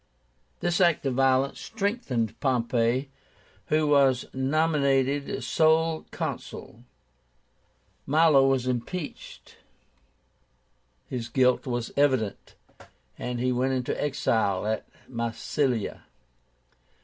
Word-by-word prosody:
This 175 +2 +1
act 170 -5 +3
of 135 - 0
violence 135 +1 +2
strengthened 200 - -2
Pompey, 125 0 0 0.6
who 155 0 +2
was 140 -4 +3
nominated 140 -1 +1
sole 160 0 +2
Consul. - - -6 1.2
Milo 150 -2 +5
was 135 -2 +1
impeached. 130 +7 -5 1.5
His 120 -3 -5
guilt 125 +1 +2
was 120 -2 -3
evident, 130 -8 0 0.6
and 125 -1 -3
he 125 +1 +1
went 130 +2 0
into 125 -1 -2
exile 110 -9 0
at 110 0 -2 0.2
Massilia. 120 0 -2
135 Hz, 90 wpm, -26 LUFS, 125-150 Hz, 1.5 s, Milo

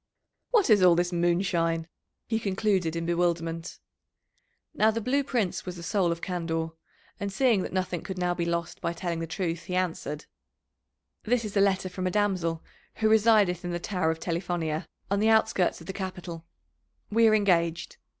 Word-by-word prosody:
"What 430 - +3
is 205 -2 +6
all 180 -2 +7
this 175 +1 0
moonshine?" 170 -1 +1 0.4
he 225 -1 0
concluded 195 -5 0
in 165 0 -2
bewilderment. 170 -1 -1 1.0
Now 215 - +4
the 225 +1 -1
Blue 260 +5 +1
Prince 235 -9 -1
was 180 -1 -6
the 170 - -9
soul 175 +1 +1
of 170 0 -4
candour, 165 -2 -2 0.5
and 200 -1 -3
seeing 230 -1 +3
that - - -4
nothing 185 -2 -2
could 190 - -6
now 180 -1 +1
be 175 - -2
lost 170 0 -3
by 170 - -1
telling 170 -1 -3
the 165 - -3
truth, 170 -1 -3
he 180 - -3
answered: 165 -5 -2 1.0
"This 235 0 0
is 210 - -6
a 200 - +4
letter 190 -1 +2
from 185 0 -3
a - - +2
damsel 180 -5 0 0.3
who 220 -1 +2
resideth 215 -5 +4
in 175 0 -3
the 175 - -2
Tower 180 -3 -1
of 160 0 -1
Telifonia, 170 -2 -2 0.2
on 200 - +2
the 220 +2 +3
outskirts 220 -6 +2
of - - -11
the 190 - -5
capital; 180 -4 -6 0.6
we 225 +1 +5
are 215 - +5
engaged. 170 -5 +1
180 Hz, 180 wpm, -27 LUFS, 170-200 Hz, 1.0 s, all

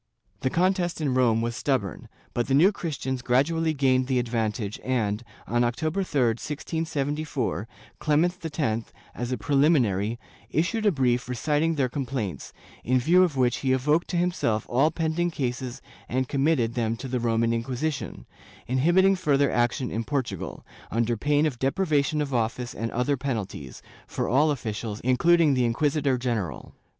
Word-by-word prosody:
^ - - -40
The 130 - +1
contest 180 +1 +1
in 145 -4 0
Rome 115 -3 +3
was 120 0 -2
stubborn, 115 - -2 0.2
but 120 - -1
the 135 - +2
New 175 +8 +6
Christians 130 - -4
grad 125 +3 +3
ually 165 -1 -1
gained 130 -2 +3
the 130 -2 +1
advantage 115 -3 -2
and, 115 -4 -1 0.2
on 120 +1 +1
October 155 +10 -1
3, 150 -7 0
1674, 145 0 -2 0.3
Clement 170 +4 +1 0.2
X, 115 -5 -1 0.2
as 120 +1 -4
a 130 - 0
preliminary, 120 - +2 0.3
issued 210 +8 0
a - - +5
brief 125 -4 +1
reciting 150 +6 0
their 135 -3 +1
complaints, 125 - -4 0.3
in 130 +2 +2
view 170 +9 +4
of 170 -7 +2
which 125 -2 +2
he 130 -1 +1
evoked 150 +6 +2
to 180 - -2
himself 170 -11 0
all 135 +6 +3
pending 165 +1 -1
cases 130 -3 -4 0.3
and 130 +1 0
committed 135 -4 +1
them 115 -1 -1
to 135 - -6
the 125 -1 -1
Roman 115 0 +1
Inquisition, 125 - -3 0.4
inhibiting 175 +10 +3
further 145 -6 +2
action 120 +1 0
in 115 - -2
Portu 135 -1 -2
gal, - - -7 0.2
under 115 +1 0
pain 145 +6 +2
of 135 -6 -2
deprivation 150 0 +1
of 140 -2 -5
office 120 +1 -1
and 115 0 -3
other 130 +5 0
penalties, 110 - -5 0.2
for - - -2
all 145 +6 +3
officials, 110 -5 -3
including 155 +5 +4
the 130 -2 +2
inquisitor 140 +3 +1
general. 115 -8 -3
130 Hz, 160 wpm, -26 LUFS, 120-155 Hz, 0.4 s, New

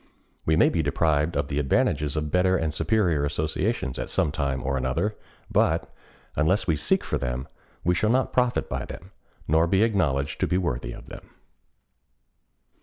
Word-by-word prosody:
We 80 - +4
may - - +5
be 85 - 0
deprived 75 +1 +1
of 70 0 0
the 70 0 -2
advantages 75 +1 +1
of 75 -1 -2
better 95 +1 +3
and 80 -3 -1
superior 90 -7 +1
associations 75 - -1
at - - -4
some 75 - +1
time 70 -3 -2
or 70 0 -1
another, 65 +11 -1 0.4
but, - - +1 0.4
unless 80 +7 +2
we 80 - +2
seek 75 - +1
for - - -2
them, 60 +1 -3 0.4
we 90 - +3
shall 105 +4 +1
not 130 +2 +1
profit 125 -1 +1
by - - -3
them, 95 +3 -10 0.4
nor 80 +2 +3
be 95 +4 +3
acknowledged 80 -11 0
to - - +1
be 90 - +1
worthy 65 -9 -2
of - - -11
them. - - -11
80 Hz, 175 wpm, -25 LUFS, 70-95 Hz, 0.4 s, may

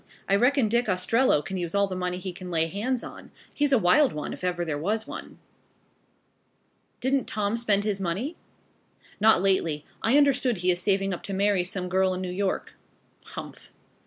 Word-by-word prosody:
I 195 - +3
reckon 250 +3 +3
Dick 235 +2 +1
Ostrello 185 - +2
can 190 +5 -4
use 175 0 -3
all 200 0 +4
the 190 -2 -5
money 180 0 -2
he 185 0 -5
can 180 0 -8
lay 165 -2 +2
hands 225 +9 -2
on. - - -10 0.2
He's 290 -1 +1
a 265 - +6
wild 235 +9 +4
one, 150 -1 -4
if - - -10
ever 175 -1 -1
there 155 -3 -2
was 210 +9 -1
one." - - -9 1.6
"Don't 265 -1 +1
Tom 210 0 -1
spend 210 -4 +2
his 205 -2 -1
money?" 195 - -2 0.8
"Not 215 -3 +5
lately. 165 -6 +1 0.2
I 240 +6 +3
understand 265 -5 +3
he 180 +1 +2
is 175 0 -1
saving 195 0 +1
up 175 - -5
to 195 - -5
marry 200 -1 +2
some 180 0 -3
girl 185 0 +1
in 185 - -4
New 180 - -4
York." 190 +1 -2 0.5
"Humph." - - -10
195 Hz, 190 wpm, -26 LUFS, 180-225 Hz, 1.6 s, a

